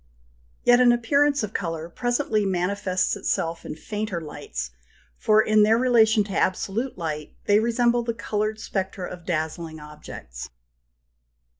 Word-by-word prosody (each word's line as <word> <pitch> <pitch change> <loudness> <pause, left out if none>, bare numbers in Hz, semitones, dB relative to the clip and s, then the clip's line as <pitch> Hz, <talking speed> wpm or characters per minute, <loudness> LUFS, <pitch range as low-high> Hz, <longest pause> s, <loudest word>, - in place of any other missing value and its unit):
Yet 245 0 +6
an 250 -1 +6
appearance 280 +3 +2
of 215 0 -4
colour 165 -3 -3
presently 240 +2 0
manifests 185 0 0
itself 165 0 -2
in - - -6
fainter 210 +2 -4
lights, 65 - -6 0.4
for 215 - +4
in 215 0 +4
their 215 +2 +5
relation 230 -3 +4
to 200 -1 -6
absolute 205 +8 -1
light 155 -3 -5
they 205 +1 +5
resemble 235 +1 +2
the 230 -1 -3
coloured 215 0 -2
spectra 190 -3 -3
of 175 -1 -10
dazzling 160 -1 -3
objects 150 - -9
(39). - - -34
205 Hz, 140 wpm, -24 LUFS, 165-230 Hz, 0.4 s, Yet